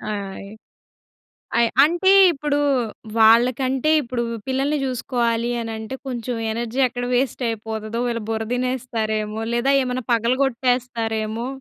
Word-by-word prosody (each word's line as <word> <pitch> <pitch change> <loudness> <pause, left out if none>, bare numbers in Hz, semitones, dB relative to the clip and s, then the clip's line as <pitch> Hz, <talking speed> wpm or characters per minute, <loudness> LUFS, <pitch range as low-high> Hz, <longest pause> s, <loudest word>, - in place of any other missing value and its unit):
ఆయ్. 195 0 -7 1.1
అయ్ 235 -1 +4
అంటే 345 +5 +2 0.2
ఇప్పుడూ 290 -1 -1 0.6
వాళ్ళకంటే 255 +5 +4
ఇప్పుడు 240 -2 -3 0.2
పిల్లల్ని 275 +3 0
చూసుకోవాలి 240 -2 -1
అనంటే 225 +2 -5
కొంచెం 245 -1 -3 0.2
ఎనర్జీ 235 +3 -3
ఎక్కడ 245 0 -5
వేస్ట్ 260 +1 0
అయిపోతదో 220 0 -4
వీళ్ళు 230 -2 -2
బుర్ర 225 0 -1
తినేస్తారేమో! 225 -4 -2
లేదా 250 +4 +2
ఏమన్నా 250 0 -3
పగలగొట్టేస్తారేమో! 235 -2 0
240 Hz, 105 wpm, -22 LUFS, 225-255 Hz, 1.1 s, అయ్